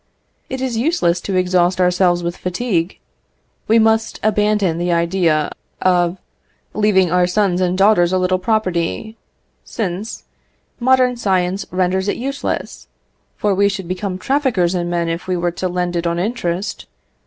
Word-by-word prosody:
It 260 -1 -4
is 255 -3 -2
useless 225 - +1
to 195 - -3
exhaust 180 0 +2
ourselves 180 -1 +2
with 170 +1 -2
fatigue: 180 -2 -2 0.7
we 225 - +4
must 220 0 +2
abandon 210 -5 +1
the 175 0 0
idea 170 -3 +1 0.3
of 180 -1 +2 0.6
leaving 195 -4 +2
our 180 0 +3
sons 185 -1 +1
and 180 0 +1
daughters 195 -3 +4
a 185 - +2
little 185 0 +1
property, 215 +1 -1 0.5
since 205 0 -4 0.6
modern 255 0 +3
science 190 -2 0
renders 185 +1 0
it - - -1
useless, 275 +3 -4 0.5
for 205 -1 +1
we 200 +1 +3
should 195 -3 -5
become 185 +1 -3
traffickers 245 -7 +1
in 175 -1 -2
men 170 -1 -1
if 165 +2 -4
we 185 -1 0
were 175 0 0
to 185 +2 -3
lend 180 0 -2
it 170 0 -1
on 170 0 -1
interest. 185 -2 -3
185 Hz, 150 wpm, -18 LUFS, 175-215 Hz, 0.7 s, we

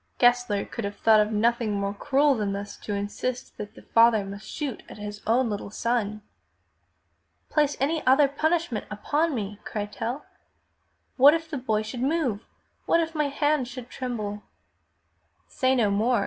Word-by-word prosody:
Gessler 245 -4 +3
could 235 - -6
have 200 0 -4
thought 220 0 +5
of 210 +1 +2
nothing 230 0 +1
more 200 0 -1
cruel 285 +6 +3
than 210 -5 -1
thus 200 +1 -5
to 205 - -4
insist 205 +5 -4
that 210 +1 -7
the - - -14
father 230 -3 +4
must 200 +1 -8
shoot 285 -6 -4
at - - -10
his 210 0 -7
own 240 +3 +3
little 205 -2 -4
son. 215 -1 -1 1.3
"Place 295 -2 +2
any 310 +4 0
other 275 +2 +6
punishment 315 -4 -1
upon 295 +9 0
me!" 210 -2 -4
cried 210 -2 -4
Tell. 240 +5 -4 0.9
*'What 280 +4 +8
if 325 -1 -5
the 290 - -2
boy 220 -4 0
should 235 +3 -6
move? 265 -7 0 0.4
What 335 - +4
if 330 -1 -1
my 300 -2 +1
hand 290 -1 +1
should 250 -1 -9
tremble?" 215 -5 -4 1.1
"Say 260 0 +1
no 220 -5 +2
more!" 225 +4 +2
235 Hz, 165 wpm, -26 LUFS, 210-280 Hz, 1.3 s, What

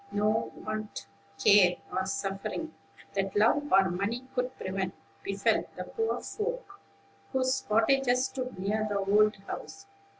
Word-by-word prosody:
No 210 +2 +1
want, 215 - -4 0.3
care, 180 0 +6 0.2
or 190 0 -1
suffering, 195 +11 -3 0.4
that 195 -1 -1
love 260 +8 +3
or 190 -1 +5
money 215 +8 -2
could 250 +1 -2
prevent, 190 0 -3 0.3
befell 195 0 +1
the - - -4
poor 450 -1 -2
folk 440 -2 -4 0.5
whose 260 0 +1
cottages 250 +3 +3
stood 255 -5 -5
near 210 +3 0
the 205 - 0
old 210 +2 +4
house. 395 - -7
215 Hz, 130 wpm, -29 LUFS, 195-260 Hz, 0.5 s, care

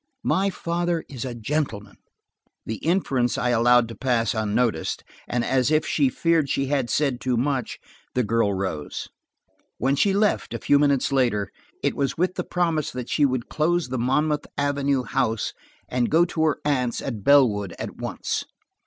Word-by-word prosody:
My 195 +1 +2
father 170 -2 -2
is 135 -2 -6
a 125 -2 -5
gentleman." 115 -3 -3 0.7
The 110 - -3
inference 140 -8 0
I 125 - 0
allowed 120 0 +4
to 115 - -7
pass 120 -1 +1
unnoticed, 110 -4 0 0.2
and 120 -1 -1
as 130 0 +2
if 155 0 +2
she 140 -4 +2
feared 165 0 +1
she 135 - 0
had 135 -3 0
said 135 -1 0
too 125 -2 0
much, 135 +1 -1 0.4
the 125 - +2
girl 110 -1 +1
rose. 95 -6 -4 0.7
When 135 +3 +1
she 195 +8 +3
left, 205 +2 +1
a - - -4
few 145 - +3
minutes 140 -2 +2
later, 120 -7 +1 0.3
it - - +1
was 140 -1 -1
with 180 +2 +1
the - - -3
promise 165 -4 0
that 125 -1 -6
she 145 - +3
would 130 -2 -2
close 165 -2 0
the 130 -1 -2
Monmouth 150 +5 +1
Avenue 140 -2 +1
house 120 -4 -1 0.3
and 125 -1 0
go 165 +3 +4
to 160 -2 -1
her 155 - +2
aunts 130 -5 0
at 115 -7 -5
Bellwood, 105 -10 +4
at - - -6
once. - - -3
130 Hz, 170 wpm, -24 LUFS, 120-150 Hz, 0.7 s, allowed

